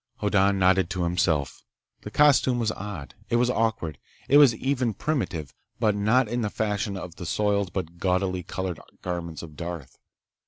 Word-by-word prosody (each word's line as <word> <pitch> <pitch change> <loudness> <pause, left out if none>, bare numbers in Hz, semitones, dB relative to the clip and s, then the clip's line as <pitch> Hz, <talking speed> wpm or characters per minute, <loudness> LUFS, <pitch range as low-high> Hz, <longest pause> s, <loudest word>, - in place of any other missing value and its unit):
Hoddan 100 -1 +2
nodded 95 -1 +3
to 90 -1 -2
himself. 85 -4 0 0.4
The - - -7
costume 140 -4 +4
was 115 -2 0
odd. 100 - -7 0.2
It - - +1
was 120 +1 +3
awkward. 105 - -1 0.3
It 140 - +6
was 135 -6 +7
even 125 -3 -1
primitive, 90 - -2 0.3
but 110 -3 +3
not 110 +5 +3
in 120 +3 -2
the 105 - -1
fashion 105 -2 -2
of 90 -2 -8
the 90 - -6
soiled 100 0 0
but 85 -2 -5
gaudily 95 0 0
colored 90 -1 -4 0.2
garments 85 -3 -4
of 80 -3 -10
Darth. 85 -6 -7
95 Hz, 165 wpm, -26 LUFS, 85-110 Hz, 0.4 s, was